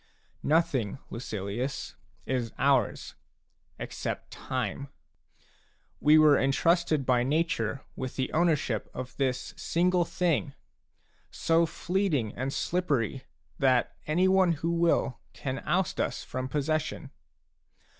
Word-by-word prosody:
Nothing, 140 -9 +1
Lucilius, 115 +3 -4 0.3
is 125 -4 -1
ours, 135 -2 +1 0.6
except - - -5
time. 130 +1 -3 1.1
We 150 +1 +6
were 155 -2 +6
entrusted 155 +1 +2
by 125 -1 +3
nature 140 -3 0
with 130 -1 -5
the 130 - -2
owner 165 0 +4
ship 115 -6 -3
of 130 0 -6
this 130 -2 -1
single 180 +1 +2
thing, 165 -5 0 0.7
so 165 0 +2
fleeting 170 - -1
and 130 +2 -2
slippery 140 - -1 0.3
that 130 -3 +2
anyone 185 +2 +4
who 165 +2 -2
will 170 -6 +1
can 130 -1 -4
oust 185 0 +1
us - - -2
from 130 0 -4
possession. 150 0 -2
140 Hz, 105 wpm, -28 LUFS, 130-165 Hz, 1.1 s, We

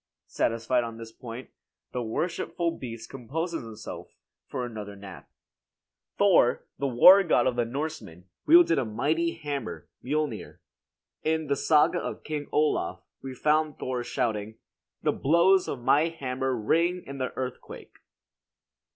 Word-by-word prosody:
Satisfied 115 +2 0
on 115 -1 -6
this 115 -1 -9
point, 120 +2 -9 0.4
the 125 - -3
worshipful 170 +7 -2
beast 115 -3 -8
composes 160 +7 -4
himself 110 -2 -9 0.3
for 125 - -3
another 105 -4 -7
nap. 100 -1 -11 0.9
Thor, - - +4
the 140 - 0
war 180 +11 +8
god 175 -5 +2
of 130 - +1
the 120 -1 +1
Norsemen, 130 - -5 0.2
wielded 340 - +6
a - - 0
mighty 150 +10 0
hammer, 145 -6 -5 0.2
Miolnir. 150 +3 -3 0.6
In 160 0 0
the 140 -1 0
"Saga 150 +2 +3
of - - -6
King 150 -2 -4
Olaf" 150 0 0 0.2
we 135 -1 -7
find 155 +2 +1
Thor 125 -1 -3
shouting: 110 -3 -2 0.5
"The - - +3
blows 175 +6 +3
of 125 -3 -5
my 150 +6 +4
hammer, 130 -4 -2
Ring 170 +10 +1
in 140 0 -8
the 130 - -2
earthquake." 130 -1 -7
135 Hz, 135 wpm, -27 LUFS, 115-160 Hz, 0.9 s, war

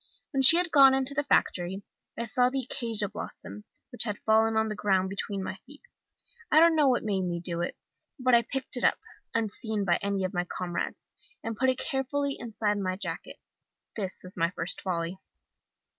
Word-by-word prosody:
When 270 -3 +1
she 295 +6 +8
had 350 -2 +1
gone 270 -2 +7
into 265 +1 0
the 290 +1 -1
factory, 190 -6 +1 0.3
I 235 - -2
saw 245 +2 +2
the 265 0 -2
acacia 225 -5 -1
blossom, 210 +1 -7 0.3
which 245 - -8
had 210 -3 -2
fallen 220 0 +4
on 220 0 +2
the 215 - -2
ground 190 -2 +1
between 195 0 -3
my 190 - -5
feet. 290 +2 -15 0.7
I 310 - +7
don't 335 0 +6
know 300 -3 +4
what 255 -2 +2
made 200 -3 0
me 175 -2 -2
do 170 -1 -3
it, 175 - -3 0.4
but 255 -2 +1
I 235 - +7
picked 260 +2 -2
it - - -4
up, - - +4 0.4
unseen 220 -1 -1
by 175 -2 +2
any 200 -1 -1
of 185 +2 -2
my 175 -1 0
comrades, 175 -1 -4 0.3
and 225 0 -3
put 260 +4 +2
it 255 - +1
carefully 275 +1 -1
inside 210 -3 -1
my 185 -1 -1
jacket. 200 - -6 0.6
That 195 -4 -2
was 185 +1 -7
my 170 -1 +1
first 170 0 -1
folly. 175 0 -3
220 Hz, 195 wpm, -28 LUFS, 190-260 Hz, 0.7 s, she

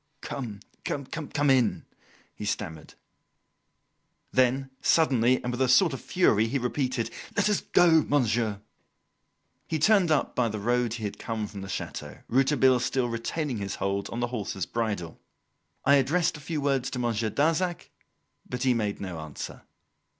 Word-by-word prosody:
"Come! 110 -7 -6 0.2
come 145 0 -2
in!" 125 -4 +2 0.5
he - - -9
stammered. 80 -1 -4 1.4
Then, 130 +1 +2
suddenly, 130 -6 +3
and 125 - -2
with 125 - -3
a 130 - +4
sort 155 +5 +5
of 135 - -5
fury, 115 - +3
he 140 - 0
repeated: 125 -1 -1 0.3
"Let 205 - +3
us 210 -2 +1
go, 165 -3 +5
monsieur." 115 -8 +1 1.1
He 160 - -1
turned 185 +2 +4
up 155 -2 +1
by 120 -2 +1
the 110 - -4
road 120 +2 +1
he 115 - -7
had 105 - -4
come 110 -2 -3
from 100 -1 -8
the 95 - -7
chateau, 75 -5 -5
Rouletabille 130 0 +4
still 125 0 0
retaining 120 +4 -2
his 100 0 -3
hold 100 0 -2
on 115 - -4
the 120 - +1
horse's 100 -5 -3
bridle. 105 -8 -3 0.7
I 140 +1 +6
addressed 160 +6 +2
a - - -8
few 150 +1 -3
words 135 -2 +1
to 130 - -5
Monsieur 115 -2 0
Darzac, 165 - 0 0.6
but 125 0 -3
he 130 -1 +4
made 105 -3 -1
no 90 -4 -5
answer. 80 -2 -7
125 Hz, 155 wpm, -27 LUFS, 110-145 Hz, 1.4 s, I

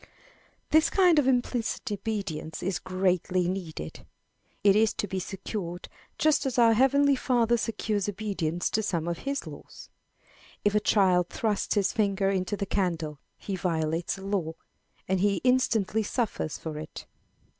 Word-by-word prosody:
This 315 0 +5
kind 360 -5 +5
of 275 - +1
implicit 245 -3 0
obedience 195 -7 -4
is 190 +1 -1
greatly 185 -1 0
needed. 175 - -5 0.6
It 200 -1 +6
is 220 0 +3
to 205 - -2
be 190 0 -3
secured 185 -2 -5 0.3
just 305 -2 +2
as 255 - -3
our 230 -2 +6
heavenly 275 +4 +4
Father 240 -3 +2
secures 215 -3 -1
obedience 185 -5 -2
to 220 - +1
some 170 -6 -2
of 170 -1 -2
his 280 - -2
laws. - - -11 0.8
If 205 - +3
a 210 - +4
child 185 -4 +3
thrusts 215 -2 -1
his 200 -2 +1
finger 200 -2 +1
into 190 +1 -1
the 200 - -2
candle, 165 -7 -2 0.2
he 195 - -4
violates 165 -1 -1
a 190 - -10
law, 195 -5 -1 0.5
and 190 0 +1
he 200 +1 +2
instantly 230 -5 +2
suffers 215 - -2
for 155 -2 -6
it. 155 - -8
200 Hz, 150 wpm, -27 LUFS, 180-225 Hz, 0.8 s, It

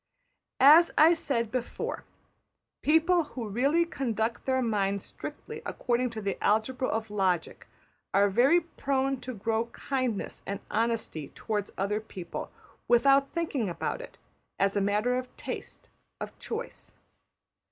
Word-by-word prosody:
As 310 +5 +8
I 320 +3 +8
said 235 -9 -1
before, 250 -2 -3 0.8
people 325 +3 +4
who 250 -6 -6
really 275 +11 +2
conduct 235 -7 -2
their 260 -1 +2
minds 200 -3 0
strictly - - -8
according 250 +1 0
to 220 -2 -6
the 200 -1 -3
algebra 235 +5 +1
of 220 -1 -2
logic 185 -5 -1 0.4
are 200 +1 +4
very 260 - +4
prone 270 -5 -1
to 255 0 -6
grow 225 +2 0
kindness 255 -3 -3
and 200 0 -3
honesty 225 -10 -1
towards 210 -2 -3
other 205 +2 0
people, 185 -5 -7 0.4
without 275 +3 +5
thinking 295 - -1
about 175 - -3
it, - - -11 0.4
as 195 +1 +1
a 200 - +2
matter 210 +5 +1
of 255 0 -10
taste, - - -7 0.3
of - - -6
choice. 460 +1 -6
235 Hz, 130 wpm, -29 LUFS, 210-275 Hz, 0.8 s, As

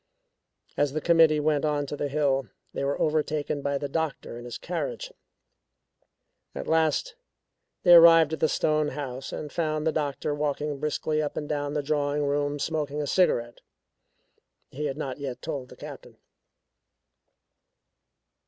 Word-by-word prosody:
As 145 -2 +1
the 155 - 0
committee 165 -2 +4
went 150 -1 +1
on 150 -1 0
to 145 - -5
the 145 - -2
hill, 135 -3 +1 0.3
they - - -3
were 140 +1 -1
overtaken 150 -1 0
by 140 0 -1
the 145 - -3
doctor 155 -4 -3
in 120 - -10
his 120 -1 -6
carriage. - - -4 1.4
At - - -5
last 160 - +1 0.7
they 175 - +7
arrived 165 -2 +8
at 160 - -3
the 160 - +2
stone 155 -1 +1
house 135 -2 -5
and 150 - -6
found 155 -2 -1
the 160 - +3
doctor 145 -1 -2
walking 145 0 -2
briskly 155 +1 -1
up 150 - -4
and 150 - -3
down 145 0 -2
the 150 - 0
drawing 145 0 0
room 145 0 0
smoking 150 0 -2
a 150 - -1
cigarette 120 -9 +1 1.1
he 150 +3 -4
had 140 -1 -3
not 135 -3 -4
yet 135 -3 -5
told 140 -5 -5
the - - -12
Captain. - - -11
150 Hz, 155 wpm, -27 LUFS, 140-155 Hz, 1.4 s, arrived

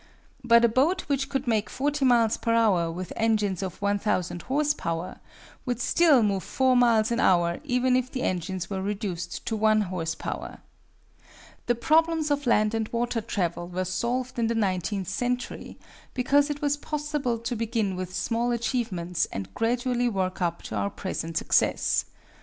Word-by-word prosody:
But 235 -1 +6
a - - +6
boat 275 +11 +2
which 275 -1 -2
could 270 0 -2
make 220 -3 +1
40 285 +1 -1
miles 235 -3 +4
per 230 0 0
hour 190 -8 +3
with 180 +2 -6
engines 210 -5 +1
of 190 -2 -5
1,000 200 -4 0
horse 295 +2 +1
power 165 - -4 0.4
would 245 -2 -2
still 300 -5 +4
move 200 -2 +1
four 260 -1 +2
miles 235 -2 +4
an 235 - 0
hour 175 -2 +3
even 250 -2 +2
if 255 0 0
the 255 -1 -4
engines 185 0 -2
were 190 -2 -3
reduced 185 -6 -4
to 225 - -1
one 215 0 +3
horse 175 -4 -3
power. - - -6 1.1
The 240 - +3
problems 320 +4 +2
of 285 -2 0
land 215 -2 +3
and 225 -1 -1
water 235 0 -1
travel 175 -5 -2
were 180 +1 -3
solved 240 +7 -2
in 230 - +2
the 230 - -1
nineteenth 190 -2 -1
century, 250 +4 -3 0.4
because 280 +3 +3
it 290 0 -4
was 290 0 +1
possible 295 -5 -2
to 230 +2 -4
begin 220 -3 -1
with 185 0 -5
small 235 +1 0
achievements 210 -8 -1
and 95 - -6
gradually 245 +1 0
work 185 -3 -2
up 170 -1 -1
to - - -6
our 200 - 0
present 165 -5 -4
success. - - +2
230 Hz, 170 wpm, -26 LUFS, 185-255 Hz, 1.1 s, But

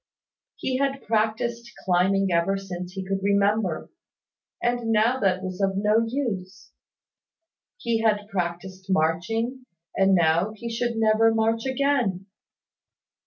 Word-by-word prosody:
He 260 -1 -2
had 275 0 -1
practised 225 +2 -1
climbing 190 +2 +2
ever 170 +3 +2
since 180 -2 -7
he 190 -1 -5
could 195 0 -1
remember; 200 -3 +1 0.7
and 240 -1 -1
now 225 +4 +3
that 190 -3 +1
was 185 +1 -5
of 195 0 +1
no 210 +3 +3
use; 220 -8 -4 1.1
he 235 - -1
had 210 -2 +1
practised 185 0 -4
marching, 225 +10 0 0.3
and 195 0 +4
now 170 +4 +2
he 235 +2 -6
should 235 0 -1
never 225 0 +4
march 225 +2 +1
again. 260 -9 0
205 Hz, 120 wpm, -25 LUFS, 190-230 Hz, 1.1 s, and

